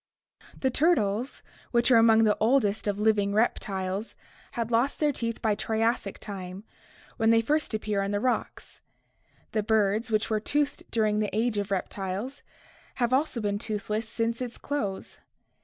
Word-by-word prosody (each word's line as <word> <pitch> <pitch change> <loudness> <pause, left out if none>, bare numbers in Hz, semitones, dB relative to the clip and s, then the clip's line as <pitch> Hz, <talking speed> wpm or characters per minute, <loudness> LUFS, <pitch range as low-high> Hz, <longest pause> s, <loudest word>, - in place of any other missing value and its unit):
The 265 - +1
turtles, 250 - +1 0.3
which 235 +1 +2
are 235 - +8
among 225 0 +6
the 210 -1 +4
oldest 220 -3 +2
of 205 0 -1
living 210 -2 +2
reptiles, 195 -2 -1 0.4
had 235 0 -3
lost 240 +5 +1
their 300 -1 +3
teeth 230 -4 -4
by 220 -2 +3
Triassic 220 0 -1
time, 190 -1 -7 0.5
when 225 0 +3
they 230 0 +6
first 290 +1 0
appear 210 -2 -1
in 195 - -1
the 205 0 0
rocks; 250 +3 -2 0.7
the 215 - +1
birds, 215 +1 +1
which 215 -1 +1
were 215 - +2
toothed 290 +6 -1
during 215 -2 +1
the 210 -1 0
Age 225 -2 +1
of 200 0 -3
Reptiles, 195 +6 -3 0.5
have 240 0 0
also 265 -2 +1
been 205 -1 -1
toothless 215 +1 -3
since 230 +1 -1
its 245 -2 -4
close. 210 -10 -4
220 Hz, 155 wpm, -27 LUFS, 205-235 Hz, 0.7 s, are